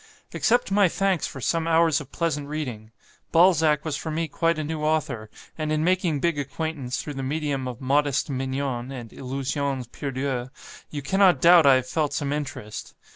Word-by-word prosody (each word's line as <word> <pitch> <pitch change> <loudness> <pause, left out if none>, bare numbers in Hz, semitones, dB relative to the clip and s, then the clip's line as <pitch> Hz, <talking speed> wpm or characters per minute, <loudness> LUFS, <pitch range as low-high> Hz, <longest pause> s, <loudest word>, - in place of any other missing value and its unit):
"Accept 245 -3 +2
my 200 -2 +4
thanks 195 -1 0
for 135 - -8
some 165 +5 0
hours 160 -3 +3
of 140 - -12
pleasant 150 -4 -2
reading. 125 -8 -5 0.4
Balzac 165 -4 +4
was 155 -3 -1
for 160 - -5
me 160 +1 -1
quite 165 +2 0
a 155 - -2
new 155 +1 -4
author; 150 -8 -1 0.3
and 155 0 -1
in 155 0 +1
making 175 -4 +1
big 170 -4 +1
acquaintance, 145 -2 -3
through 150 - -5
the 135 - -5
medium 140 -1 -2
of 125 -2 -6
'Modeste 140 +1 +1
Mignon,' 130 -1 -3
and 120 -4 -8
'Illusions 135 0 -3
perdues,' 130 0 -3 0.4
you 145 -2 -5
cannot 190 +4 +4
doubt 170 -3 +7
I 135 - +8
have 130 -1 0
felt 150 0 -1
some 140 0 -1
interest. 130 -8 -6
145 Hz, 180 wpm, -25 LUFS, 135-160 Hz, 0.4 s, I